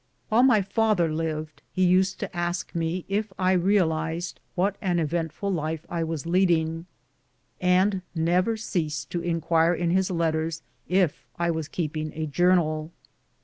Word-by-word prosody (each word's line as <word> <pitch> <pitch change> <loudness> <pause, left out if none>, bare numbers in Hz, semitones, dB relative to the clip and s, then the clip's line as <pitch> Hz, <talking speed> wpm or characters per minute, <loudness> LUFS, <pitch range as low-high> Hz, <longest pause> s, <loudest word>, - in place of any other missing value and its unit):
While 220 +3 +4
my 245 -6 +5
father 195 -5 +1
lived, 155 -1 -3
he 185 -1 +2
used 185 +1 +3
to - - -5
ask 175 0 -2
me 170 +2 -2
if 205 +1 -1
I 185 0 +2
real 185 -2 +3
ized 160 +2 -4 0.2
wdiat 190 +3 +2
an 180 -3 +1
eventful 165 +4 -1
life 160 -1 -3
I 170 -1 -1
was 160 -2 -4
leading, 170 -2 +1 0.7
and 185 +2 +3
never 180 +7 +2
ceased 155 -10 -3
to 175 - -2
inquire 165 0 +2
in 170 0 0
his 190 +1 +2
letters 165 -2 -1 0.2
if 170 -8 +1
I 170 0 +1
was 160 -2 -3
keeping 155 -2 -3
a 160 0 -2
jour 175 +5 +3
nal. 155 -2 -1
170 Hz, 155 wpm, -26 LUFS, 160-185 Hz, 0.7 s, my